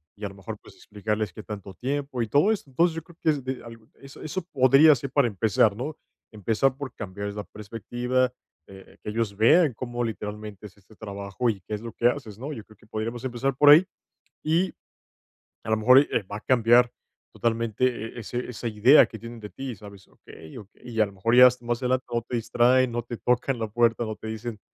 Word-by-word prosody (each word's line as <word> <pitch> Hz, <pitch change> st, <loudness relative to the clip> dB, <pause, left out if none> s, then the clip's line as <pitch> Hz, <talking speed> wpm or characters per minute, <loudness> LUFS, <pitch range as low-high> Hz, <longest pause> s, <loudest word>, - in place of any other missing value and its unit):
Y 105 Hz, 0 st, -7 dB
a -, -, -3 dB
lo 100 Hz, -, -14 dB
mejor, 100 Hz, +2 st, -8 dB
pues, -, -, -17 dB
explicarles 105 Hz, -1 st, -3 dB
qué 110 Hz, -, -9 dB
tanto 100 Hz, -2 st, -8 dB
tiempo 135 Hz, +2 st, -3 dB
y 115 Hz, -, -1 dB
todo 145 Hz, -, +3 dB
eso. 195 Hz, -10 st, -3 dB
Entonces, 165 Hz, +6 st, +2 dB
yo 165 Hz, -, -4 dB
creo 170 Hz, -1 st, -18 dB
que 160 Hz, -, +3 dB
es 145 Hz, -4 st, 0 dB
de 130 Hz, 0 st, -5 dB
algo 115 Hz, -1 st, -13 dB
eso 135 Hz, 0 st, -14 dB
eso 155 Hz, +5 st, -4 dB
podría 135 Hz, +4 st, +6 dB
ser 135 Hz, +2 st, -6 dB
para 140 Hz, -4 st, +3 dB
empezar, 105 Hz, 0 st, +2 dB
¿no? 145 Hz, +6 st, -5 dB, 0.4 s
Empezar 115 Hz, +6 st, 0 dB
por 135 Hz, -4 st, -6 dB
cambiarles 100 Hz, 0 st, -6 dB
la 105 Hz, -, -4 dB
perspectiva, 120 Hz, +4 st, -2 dB, 0.3 s
eh, 95 Hz, -1 st, -15 dB
que -, -, -6 dB
ellos 110 Hz, -2 st, -2 dB
vean 145 Hz, +5 st, +5 dB
cómo 120 Hz, 0 st, -4 dB
literalmente 105 Hz, -2 st, -6 dB
es 100 Hz, -, -20 dB
este 100 Hz, +2 st, -21 dB
trabajo 100 Hz, +3 st, -3 dB
y 100 Hz, -4 st, -3 dB
qué 105 Hz, -, -8 dB
es 105 Hz, -, -3 dB
lo 115 Hz, -1 st, -8 dB
que 120 Hz, -, +2 dB
haces, 120 Hz, -6 st, -3 dB
¿no? 140 Hz, +5 st, -6 dB
Yo 110 Hz, -, -8 dB
creo 110 Hz, -2 st, -19 dB
que 110 Hz, -, -23 dB
podríamos 115 Hz, +3 st, -4 dB
empezar 130 Hz, +1 st, -2 dB
por 145 Hz, +2 st, +6 dB
ahí. 165 Hz, +6 st, +8 dB, 0.6 s
Y, 170 Hz, +4 st, +1 dB, 0.9 s
a -, -, -5 dB
lo 110 Hz, -, +3 dB
mejor, 125 Hz, +5 st, +7 dB
y, 145 Hz, -, +2 dB
eh 110 Hz, -, 0 dB
va 105 Hz, -, -3 dB
a -, -, -11 dB
cambiar 120 Hz, 0 st, +4 dB, 0.4 s
totalmente 115 Hz, +1 st, 0 dB
e 120 Hz, -1 st, -3 dB
ese 120 Hz, +3 st, -5 dB
esa 120 Hz, 0 st, -5 dB
idea 115 Hz, +7 st, +6 dB
que 110 Hz, -, -10 dB
tienen 115 Hz, 0 st, -9 dB
de 105 Hz, -, -8 dB
ti, 130 Hz, +5 st, -6 dB
¿sabes? 100 Hz, -1 st, -14 dB
Okey, 80 Hz, +5 st, -14 dB
okey, 105 Hz, +2 st, -13 dB
y 115 Hz, -2 st, 0 dB
a 105 Hz, -, +5 dB
lo 100 Hz, -, -10 dB
mejor 115 Hz, +5 st, +1 dB
ya 125 Hz, 0 st, +10 dB
más 120 Hz, +1 st, -2 dB
adelante 130 Hz, +1 st, 0 dB
no 120 Hz, -, +1 dB
te 120 Hz, +1 st, -6 dB
distraen, 120 Hz, +2 st, +3 dB
no 120 Hz, 0 st, -3 dB
te 120 Hz, -1 st, -7 dB
tocan 125 Hz, 0 st, 0 dB
la 110 Hz, -, -2 dB
puerta, 120 Hz, +1 st, +2 dB
no 110 Hz, 0 st, -4 dB
te 110 Hz, -, -9 dB
dicen, 110 Hz, 0 st, -6 dB
115 Hz, 225 wpm, -25 LUFS, 105-130 Hz, 0.9 s, ya